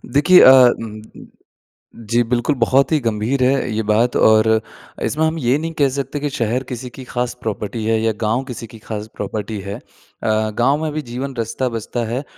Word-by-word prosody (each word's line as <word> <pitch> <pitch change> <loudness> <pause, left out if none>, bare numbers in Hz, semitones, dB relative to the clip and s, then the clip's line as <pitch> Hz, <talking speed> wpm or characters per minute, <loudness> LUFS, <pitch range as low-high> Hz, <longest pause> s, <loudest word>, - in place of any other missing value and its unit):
देखिए 175 +6 +7
अ, 130 - +9
उम, 120 -4 +4 0.2
उम, - - -12 0.8
जी 120 +1 +3
बिल्कुल 125 +4 +1
बहुत 130 +4 +2
ही 155 - +3
गंभीर 115 +4 0
है 130 -2 +1
ये 110 - -1
बात 115 +3 +2
और 110 0 +4 0.6
इसमें 155 +2 0
हम 160 +1 -1
ये 125 0 +2
नहीं 165 +1 -4
कह 140 -2 +4
सकते 140 +2 -4
कि 145 +1 -2
शहर 120 0 -1
किसी 125 +1 -5
की 130 - -8
खास 125 -1 -3
प्रॉपर्टी 110 +1 -4
है 110 0 +2
या 110 0 +1
गाँव 115 +5 0
किसी 115 -1 -7
की 115 - -11
खास 105 -1 -6
प्रॉपर्टी 105 +1 -4
है। 100 +1 -6
अ, - - -16 0.8
गाँव 140 +5 +2
में 155 - -2
भी 155 - -2
जीवन 130 +1 -6
रचता-बचता 115 0 -3
है। 130 +5 -2
120 Hz, 195 wpm, -19 LUFS, 110-135 Hz, 0.8 s, अ